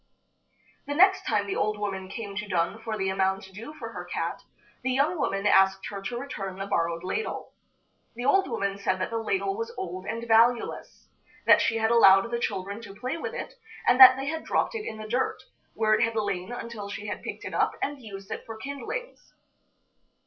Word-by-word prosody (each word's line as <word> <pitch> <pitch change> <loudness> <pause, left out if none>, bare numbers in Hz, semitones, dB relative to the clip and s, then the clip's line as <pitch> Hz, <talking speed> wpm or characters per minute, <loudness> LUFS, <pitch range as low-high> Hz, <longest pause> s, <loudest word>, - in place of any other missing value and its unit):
The 290 - -2
next 380 +3 +5
time 210 -3 +1
the 200 - -3
old 215 0 0
woman 195 -2 -4
came 200 -1 -6
to 210 +1 -3
dun 180 +4 -1
for 220 -1 -3
the 195 -1 0
amount 190 0 0
due 225 +9 -8
for 235 -7 -7
her - - -6
cat, - - -3 0.4
the 260 - -1
young 280 +6 +2
woman 195 -6 -1
asked 190 -1 +4
her 200 -1 -6
to 240 +5 -4
return 205 -8 -5
the 195 - -4
borrowed 170 -4 -1
ladle. 315 - -3 0.6
The 245 +1 -5
old 385 +8 +3
woman 200 0 -2
said 185 -1 0
that 185 - -2
the 230 - -1
ladle 385 - -1
was 455 +2 -4
old 185 - -5
and 230 +1 -4
valueless; 230 +1 +2 0.4
that - - +7
she 225 - +1
had 220 0 +1
allowed 195 -1 +6
the 235 - -1
children 200 0 -3
to 200 -4 -10
play 255 +7 -3
with 460 +7 -5
it, - - -6 0.3
and 250 +1 +5
that 260 0 +11
they 270 - -3
had 320 +2 -3
dropped - - 0
it 435 -2 -4
in 220 - -5
the 215 0 -7
dirt, 250 +4 0 0.4
where 215 -1 +2
it 215 - +3
had 230 0 +1
lain 200 -2 -2
until 230 -4 -6
she 205 +1 -6
had 205 - -4
picked - - -7
it - - -6
up - - +1
and 285 -1 -3
used 195 -4 -10
it - - -4
for 225 -1 -7
kindlings. 280 - -6
220 Hz, 210 wpm, -27 LUFS, 195-255 Hz, 0.6 s, that